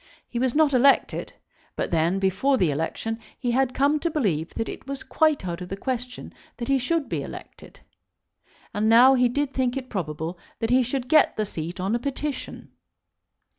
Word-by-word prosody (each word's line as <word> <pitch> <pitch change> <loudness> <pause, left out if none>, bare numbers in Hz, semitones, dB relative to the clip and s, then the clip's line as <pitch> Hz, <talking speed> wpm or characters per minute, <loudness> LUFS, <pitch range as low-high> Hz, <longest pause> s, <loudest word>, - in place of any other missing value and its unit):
He 240 - -4
was 255 0 0
not 300 -2 +4
elected; 270 +2 +3 0.4
but - - -3
then, 170 +3 +2
before 195 +9 +2
the 175 -9 +2
election, 165 +9 -3 0.2
he 245 -2 -1
had 260 +1 +1
come 285 +2 +2
to 335 - -1
believe 195 - -1
that 225 - -2
it - - -8
was 275 -1 -5
quite 310 -11 +1
out 170 0 -4
of 180 - -7
the 195 - -4
question 250 +2 -5 0.2
that 235 - -5
he 275 -1 +3
should 300 +4 0
be - - -2
elected. - - -11 0.9
And 215 +1 +1
now 245 +4 +8
he 250 -2 +3
did 285 +2 -1
think 255 0 0
it 255 -1 -6
probable 165 -2 -4 0.2
that 225 0 -2
he 255 +1 +5
should 250 +1 -2
get 310 +2 +4
the 215 - 0
seat 170 -1 -6
on 190 +4 -1
a 240 - +1
petition. 280 +2 -5
245 Hz, 190 wpm, -25 LUFS, 195-270 Hz, 0.9 s, now